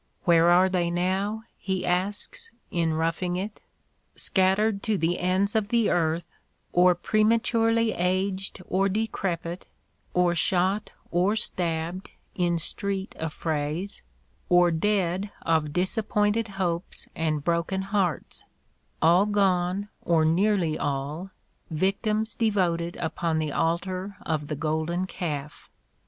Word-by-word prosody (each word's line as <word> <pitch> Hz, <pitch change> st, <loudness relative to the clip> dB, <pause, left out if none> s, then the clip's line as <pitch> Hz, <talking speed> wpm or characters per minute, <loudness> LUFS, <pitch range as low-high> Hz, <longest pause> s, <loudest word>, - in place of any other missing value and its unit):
Where 170 Hz, -1 st, +5 dB
are 180 Hz, +2 st, +6 dB
they 180 Hz, -2 st, 0 dB
now? 190 Hz, +5 st, -1 dB, 0.2 s
he 190 Hz, -2 st, -2 dB
asks 185 Hz, +3 st, -2 dB, 0.2 s
in 165 Hz, -4 st, +1 dB
"Roughing 165 Hz, +2 st, -1 dB
It." 200 Hz, +3 st, -5 dB, 0.5 s
"Scattered 195 Hz, +2 st, +2 dB
to 215 Hz, -1 st, 0 dB
the 170 Hz, +1 st, 0 dB
ends 190 Hz, +4 st, +1 dB
of 215 Hz, -2 st, +2 dB
the 235 Hz, -2 st, +2 dB
earth, 165 Hz, 0 st, +1 dB, 0.5 s
or 180 Hz, 0 st, +5 dB
prematurely 225 Hz, +3 st, +2 dB
aged 190 Hz, +1 st, -1 dB
or 195 Hz, +2 st, +2 dB
decrepit 185 Hz, -5 st, -2 dB, 0.2 s
— -, -, -40 dB
or 180 Hz, -1 st, +3 dB
shot 190 Hz, +4 st, +1 dB, 0.2 s
or 180 Hz, +5 st, +2 dB
stabbed 175 Hz, -3 st, -2 dB, 0.2 s
in 175 Hz, -2 st, +1 dB
street 195 Hz, +4 st, -2 dB
affrays 160 Hz, +3 st, -2 dB, 0.2 s
— 65 Hz, -, -39 dB
or 175 Hz, -1 st, +4 dB
dead 190 Hz, +2 st, 0 dB
of 160 Hz, -2 st, +1 dB
dis 180 Hz, +6 st, 0 dB
appointed 210 Hz, +1 st, +1 dB
hopes 175 Hz, -2 st, -2 dB
and 155 Hz, -2 st, -1 dB
broken 170 Hz, +3 st, 0 dB
hearts 195 Hz, -4 st, -1 dB, 0.3 s
— -, -, -42 dB
all 175 Hz, +5 st, +5 dB
gone, 195 Hz, -1 st, +1 dB, 0.2 s
or 165 Hz, -2 st, +3 dB
nearly 175 Hz, -1 st, +2 dB
all, 145 Hz, +6 st, -3 dB, 0.4 s
victims 205 Hz, +6 st, 0 dB
devoted 175 Hz, -6 st, 0 dB
upon 165 Hz, -3 st, -1 dB
the 155 Hz, -2 st, -1 dB
altar 185 Hz, +5 st, -1 dB
of 155 Hz, -2 st, -1 dB
the 150 Hz, -, -3 dB
golden 160 Hz, +4 st, -1 dB
calf." 150 Hz, -6 st, -5 dB
180 Hz, 125 wpm, -26 LUFS, 165-200 Hz, 0.5 s, are